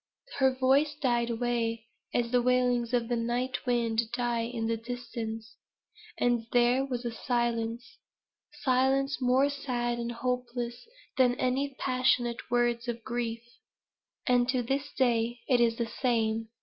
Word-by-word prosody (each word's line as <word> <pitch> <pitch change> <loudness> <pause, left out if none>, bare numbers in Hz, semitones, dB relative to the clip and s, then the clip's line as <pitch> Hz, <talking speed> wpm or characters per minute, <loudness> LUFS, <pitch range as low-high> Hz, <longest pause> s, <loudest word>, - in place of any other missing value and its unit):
Her 265 -1 +5
voice 270 +3 +2
died 240 -5 +1
away, 230 -1 -1 0.3
as 235 -1 0
the 250 -1 +4
wailings 245 -1 +2
of 240 -2 +1
the 240 - 0
night 240 +3 -2
wind 230 -2 +2
die 240 -1 0
in 230 -1 -3
the 230 0 +1
distance; 225 -1 -6 0.6
and 240 -2 +1
there 245 +2 +4
was 250 -3 -4 0.2
silence 235 -1 -1 0.6
silence 270 +2 +2
more 255 +2 +4
sad 245 -4 -2
and 235 0 -3
hopeless 245 - -3 0.3
than 250 -1 +5
any 265 +2 -1
passionate 250 -2 +1
words 240 0 +1
of 235 -1 -4
grief. 230 -1 -3 0.8
And 245 -1 +3
to 255 -1 +1
this 275 +4 -2
day 240 -2 +1
it 250 -3 +4
is 230 -1 +3
the 235 - -1
same. 225 -2 0
240 Hz, 135 wpm, -29 LUFS, 235-255 Hz, 0.8 s, Her